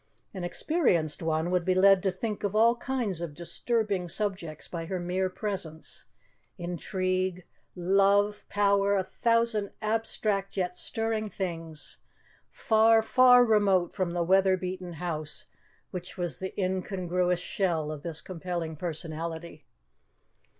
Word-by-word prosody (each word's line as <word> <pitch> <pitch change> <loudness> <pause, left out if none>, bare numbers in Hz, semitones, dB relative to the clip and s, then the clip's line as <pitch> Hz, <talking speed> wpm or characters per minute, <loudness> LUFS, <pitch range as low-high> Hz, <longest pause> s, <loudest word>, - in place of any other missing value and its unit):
An 190 -3 -5
experienced 175 - +1
one 160 +1 0
would 180 -1 +2
be 185 +1 +1
led 195 0 +6
to 190 - +1
think 210 +3 -4
of 205 0 -1
all 230 +2 +5
kinds 235 -9 -2
of 160 -4 -5
disturbing 195 +1 -1
subjects 185 -6 -2
by 165 -2 -5
her 185 0 -2
mere 185 +2 -1
presence; 185 -5 -4 0.5
intrigue, 185 +1 -2 0.3
love, 200 +3 +2
power 200 0 +3
a 190 - +1
thousand 230 -1 +1
abstract 215 -2 -1
yet 180 -1 -1
stirring 225 +1 -2
things, 165 -5 -4 0.5
far, 225 0 +4
far 250 +1 +6
remote 200 -6 +3
from 185 -3 -1
the 170 0 -1
weather 190 +1 +4
beaten 185 -1 -5
house 160 -3 -4 0.5
which 180 +1 -7
was 175 -2 -3
the 190 +2 -5
incongruous 180 -1 0
shell 170 -4 -1
of 150 -2 -6
this 160 -1 -3
compelling 170 -2 -4
personality. 160 -1 -5
185 Hz, 130 wpm, -28 LUFS, 170-205 Hz, 0.5 s, led